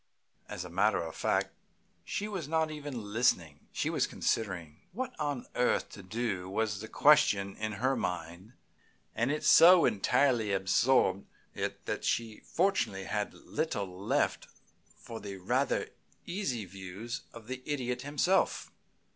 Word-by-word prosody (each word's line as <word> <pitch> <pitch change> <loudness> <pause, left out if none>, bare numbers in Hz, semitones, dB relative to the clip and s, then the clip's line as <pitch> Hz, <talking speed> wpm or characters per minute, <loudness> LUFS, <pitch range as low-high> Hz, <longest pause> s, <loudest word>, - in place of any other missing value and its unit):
As - - -5
a - - -8
matter - - +2
of - - -7
fact, - - 0 0.5
she 205 - -3
was 190 -8 -4
not 160 0 +1
even 135 -9 -6
listening. 90 - +1
She - - -2
was - - +1
considering. 85 -8 -2 0.2
What 255 +5 -4
on 145 -4 -2
earth 125 - +1
to 100 - -10
do 95 -2 -3
was 105 0 -1
the 110 - -6
question 110 -10 +4
in 110 0 -3
her 130 +7 +1
mind, 90 +4 -4 0.6
and 120 +2 0
it 150 +1 -2
so 165 +3 +8
entirely 110 0 +2
absorbed 95 0 +2 0.3
it - - -4
that - - -3
she 115 -2 -1
fortunately 140 - 0
had 105 +1 -3
little 95 -3 -3
left - - 0 0.5
for 115 -1 -8
the 100 -1 -7
rather 90 - 0 0.4
easy 170 - -2
views 95 - -7
of 115 -2 -12
the 130 +2 -6
Idiot 125 -4 -2
himself. 150 +7 +1
115 Hz, 140 wpm, -31 LUFS, 100-145 Hz, 0.6 s, so